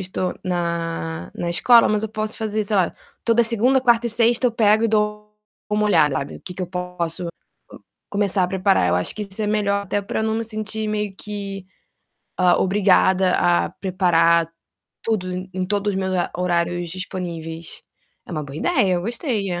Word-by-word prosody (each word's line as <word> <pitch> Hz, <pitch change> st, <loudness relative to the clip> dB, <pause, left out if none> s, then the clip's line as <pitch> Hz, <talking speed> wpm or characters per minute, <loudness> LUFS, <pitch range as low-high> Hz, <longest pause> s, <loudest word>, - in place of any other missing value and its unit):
estou 185 Hz, -1 st, -3 dB
na 170 Hz, -2 st, -3 dB
na 175 Hz, -, -3 dB
escola, 230 Hz, +7 st, +5 dB
mas 210 Hz, 0 st, +1 dB
eu 220 Hz, -, -2 dB
posso 215 Hz, 0 st, -3 dB
fazer, 215 Hz, -1 st, -2 dB
sei 210 Hz, -, -2 dB
lá, 180 Hz, -3 st, +1 dB, 0.3 s
toda 235 Hz, 0 st, +4 dB
segunda, 240 Hz, +4 st, +3 dB
quarta 240 Hz, -2 st, +3 dB
e -, -, -2 dB
sexta 235 Hz, +2 st, +3 dB
eu -, -, -7 dB
pego 220 Hz, 0 st, +3 dB
e -, -, +3 dB
dou 210 Hz, -1 st, -1 dB, 0.4 s
uma 210 Hz, 0 st, +1 dB
olhada, 150 Hz, -8 st, +3 dB
sabe, 140 Hz, -, -4 dB
o -, -, -15 dB
que 180 Hz, -, -8 dB
que 185 Hz, -, -4 dB
eu -, -, -3 dB
posso 180 Hz, -1 st, -3 dB, 0.8 s
começar 200 Hz, -2 st, +2 dB
a 180 Hz, -, -2 dB
preparar. 140 Hz, -, +2 dB
Eu 85 Hz, -, +2 dB
acho 90 Hz, -, -1 dB
que 215 Hz, -, -4 dB
isso 200 Hz, +1 st, -3 dB
é -, -, 0 dB
melhor 200 Hz, -1 st, 0 dB
até 205 Hz, +1 st, -2 dB
pra 200 Hz, +2 st, -3 dB
não 220 Hz, 0 st, 0 dB
me 230 Hz, -, -2 dB
sentir 215 Hz, 0 st, -4 dB
meio 210 Hz, -2 st, -2 dB
que, 200 Hz, -2 st, -6 dB, 0.7 s
hã, 180 Hz, -1 st, +5 dB
obrigada 190 Hz, -1 st, +3 dB
a 175 Hz, 0 st, +2 dB
preparar 170 Hz, -3 st, +2 dB, 0.5 s
tudo 205 Hz, -5 st, -1 dB, 0.2 s
em 185 Hz, 0 st, -2 dB
todos 205 Hz, +1 st, 0 dB
os 190 Hz, -, -1 dB
meus 190 Hz, 0 st, -2 dB
hora 180 Hz, -, 0 dB
horários 175 Hz, -1 st, -1 dB
disponíveis. 170 Hz, -3 st, -6 dB, 0.4 s
É -, -, -8 dB
uma 155 Hz, -, -2 dB
boa 140 Hz, 0 st, -9 dB
ideia, 200 Hz, -, +2 dB
eu 175 Hz, -, -1 dB
gostei, 230 Hz, -, -2 dB
é. 175 Hz, -, -3 dB
195 Hz, 190 wpm, -21 LUFS, 175-215 Hz, 0.8 s, escola